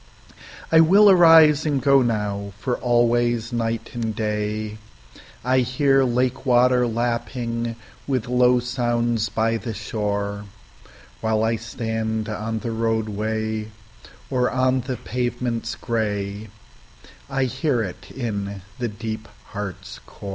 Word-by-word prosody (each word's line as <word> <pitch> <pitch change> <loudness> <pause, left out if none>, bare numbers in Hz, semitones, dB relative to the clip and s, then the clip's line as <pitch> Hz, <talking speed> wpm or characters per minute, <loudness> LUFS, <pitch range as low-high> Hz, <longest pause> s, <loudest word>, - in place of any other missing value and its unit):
I 160 - +7
will 195 +6 +7
arise 160 -4 +7
and 145 -3 0
go 140 +1 +4
now, 105 -4 -2
for 125 +3 -2
always 120 -1 +1
night 115 -1 -2
and 115 -3 -3
dayI 105 - -3
hear 135 +2 +2
lake 125 +1 0
water 125 -1 +4
lapping 115 0 -2 0.3
with 130 -5 -1
low 125 0 +4
sounds 120 -2 0
by 115 +2 0
the 110 +1 -6
shore; 100 -1 -3 0.8
While 110 -1 +1
I 115 +1 +2
stand 110 -1 -3
on 110 +1 -3
the 115 - -3
roadway, 110 -1 -2 0.6
or 125 -2 +2
on 130 0 +1
the 125 0 -4
pavements 120 0 -3
gray,I 105 +3 -5
hear 130 -1 0
it 95 -4 -8
in 100 -6 -4 0.2
the 120 - -1
deep 110 0 -6 0.2
heart's 100 -2 -7
core. 100 - -9
115 Hz, 115 wpm, -23 LUFS, 110-125 Hz, 0.8 s, I